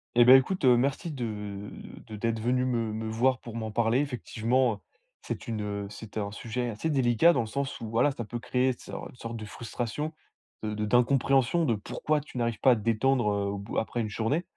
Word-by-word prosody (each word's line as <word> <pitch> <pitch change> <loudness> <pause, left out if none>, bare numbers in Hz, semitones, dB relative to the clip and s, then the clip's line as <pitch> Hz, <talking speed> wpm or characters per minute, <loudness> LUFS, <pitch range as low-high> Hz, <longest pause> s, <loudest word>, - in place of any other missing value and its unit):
Et 120 0 +7
bah 130 +2 +10
écoute, 135 +5 +2
heu, 125 -1 +7
merci 135 +7 0
de 105 -7 -5 0.4
de 110 - -7
d'être 115 +1 -1
venu 125 +2 +1
me 115 -3 0
me 110 +1 -4
voir 120 +3 +2
pour 115 -2 -9
m'en 110 -1 -3
parler. 115 +3 +2
Effectivement, 125 -3 0 0.4
c'est - - -6
une 110 -2 -2
heu 100 -1 -3
c'était 110 +1 -7
un 100 -1 -3
sujet 120 +3 -3
assez 115 +9 -3
délicat, 130 +2 +4
dans 165 - +1
le 115 - 0
sens 140 +4 -3
où, 115 -2 -6
voilà, 115 +6 +3
ça 120 -4 -5
peut 120 - -5
créer 125 +2 +1
so - - -7
une - - -15
sorte 115 -1 -6
de 110 - -7
frustration, 120 +7 -4 0.5
de 105 -1 -2
de 105 0 -2
d'incompréhension 135 +6 +3
de 120 -8 +2
pourquoi 150 +8 -1
tu 140 -2 -10
n'arrives 115 -2 -1
pas 130 - +6
à - - +5
te 110 - -5
détendre, 115 +2 +2
heu, 100 0 0
au 100 - -4
bout 100 +2 -6
après 120 +1 -1
une 110 - -2
journée. 115 +11 0
120 Hz, 220 wpm, -28 LUFS, 110-130 Hz, 0.5 s, bah